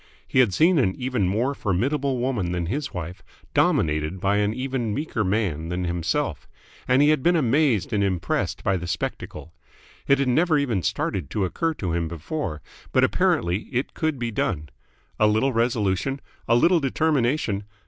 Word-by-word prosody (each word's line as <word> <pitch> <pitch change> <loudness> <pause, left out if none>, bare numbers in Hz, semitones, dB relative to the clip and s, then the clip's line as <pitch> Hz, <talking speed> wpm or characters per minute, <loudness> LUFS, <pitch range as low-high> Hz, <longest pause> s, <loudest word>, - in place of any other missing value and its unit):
He - - +1
had 120 -6 +5
seen 165 - +4
an 95 -7 +1
even 125 -7 -1
more 115 +9 0
formidable 135 +6 0
woman 120 -8 -1
than 85 -1 -2
his 140 - -3
wife 90 0 -6 0.3
dominated 75 +3 +1
by 100 +2 +1
an 105 0 +1
even 130 -3 -2
meeker 140 -6 -2
man 95 -6 -1
than 90 +1 -2
himself, 85 -1 -2 0.4
and 130 +3 +4
he 145 - +5
had 155 -3 +3
been 175 +5 +3
amazed 135 - +2
and 100 -1 +2
impressed 95 -3 -1
by 95 - +1
the 90 0 -6
spectacle. 85 -1 -5 0.5
It 140 - +5
had 135 -1 0
never 155 +5 +3
even 120 -9 0
started 85 -1 -2
to 100 -3 -1
occur 165 - -1
to 90 - -3
him 85 -1 -1
before, 85 - -5 0.3
but - - +3
apparently 90 +5 +1
it 125 +2 -2
could 160 -3 -1
be 120 -1 -3
done. 75 -7 -2 0.5
A 105 - +5
little 110 +6 +2
resolution, 115 +2 0 0.3
a 115 - +4
little 170 +8 +4
determination 135 -7 0
115 Hz, 170 wpm, -24 LUFS, 90-135 Hz, 0.5 s, had